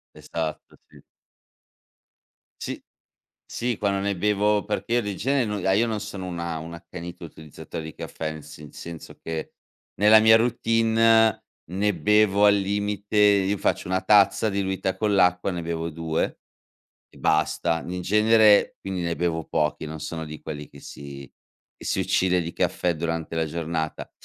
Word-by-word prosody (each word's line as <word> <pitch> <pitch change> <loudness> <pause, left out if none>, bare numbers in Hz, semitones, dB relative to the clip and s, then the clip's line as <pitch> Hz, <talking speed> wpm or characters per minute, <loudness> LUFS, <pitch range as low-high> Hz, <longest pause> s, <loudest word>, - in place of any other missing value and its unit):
Esatto, 80 -2 -5
sì. - - -18 1.6
Sì - - -5 0.7
sì, 120 -2 -2
quando 100 -1 0
ne 100 0 -1
bevo 105 +2 +1
perché 105 +3 -2
io 120 - +3
di 105 -2 -4
genere 135 +5 +1
no 105 -3 -2
ah, - - +4
io 110 +5 +3
non 110 -2 -2
sono 100 -2 -6
una 85 -2 -4
un 85 +2 -8
accanito 85 +1 -9
utilizzatore 80 0 -9
di 80 - -8
caffè 80 -1 -5
nel 80 -1 -9
se 75 0 -11
senso 85 -2 -9
che, 80 -1 -5 0.5
nella 105 +1 +8
mia 110 +1 +7
routine 115 -1 +3 0.3
ne 100 +3 0
bevo 105 0 +3
al 100 0 +6
limite 100 +1 -2
io 100 -1 +4
faccio - - -1
1 95 +1 0
tazza 105 +2 +4
diluita 95 -1 -2
con 105 +1 0
l'acqua, 90 0 +3
ne 85 -1 -4
bevo 85 0 -3
2, 80 0 -2 0.7
e - - -18
basta, 85 -1 +1
in 90 +1 -4
genere 105 +2 +4
quindi 95 -2 -4
ne 85 0 -1
bevo 80 -2 -1
pochi, 75 0 -1
non 80 0 -7
sono 80 +2 -5
di 75 0 -9
quelli 75 -1 -7
che 70 - -14
si 70 -2 -10 0.5
che - - -13
si - - 0
uccide 90 -1 +2
di 85 +1 -6
caffè 90 -1 0
durante 80 0 -3
la 80 - +1
giornata. 80 0 -4
95 Hz, 160 wpm, -24 LUFS, 80-105 Hz, 1.6 s, nella